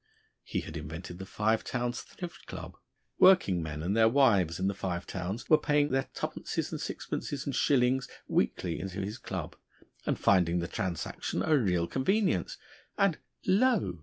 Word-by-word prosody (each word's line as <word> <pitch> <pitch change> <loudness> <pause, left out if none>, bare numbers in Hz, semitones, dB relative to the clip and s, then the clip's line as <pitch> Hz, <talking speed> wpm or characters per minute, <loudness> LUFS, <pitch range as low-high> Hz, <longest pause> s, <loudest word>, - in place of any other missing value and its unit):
He - - -3
had - - -7
invented 80 +3 -7
the 95 - -7
Five 110 +3 +1
Towns 120 0 -2
Thrift 175 -2 -9
Club; - - -7 0.4
working 180 - +6
men 75 -1 -5
and 95 +5 0
their 110 0 +6
wives 100 - +3
in 95 - 0
the 100 - +1
Five 95 -2 -3
Towns 95 +5 -4
were 155 - +6
paying 150 -1 +2
their 135 0 +1
two - - -1
pences, - - -4
and - - -4
sixpences, 140 -2 -4
and 140 - -2
shillings 130 -1 +3 0.2
weekly 85 -2 0
into 95 +1 -4
his 100 +3 -4
Club, - - -5 0.5
and - - +1
finding 90 -3 +3
the 85 -1 -1
transaction 90 -1 -3
a 160 - +4
real 90 -10 +2
convenience 190 - +1 0.4
and 200 -5 +2 0.3
lo! 210 - +2
105 Hz, 165 wpm, -30 LUFS, 90-140 Hz, 0.5 s, working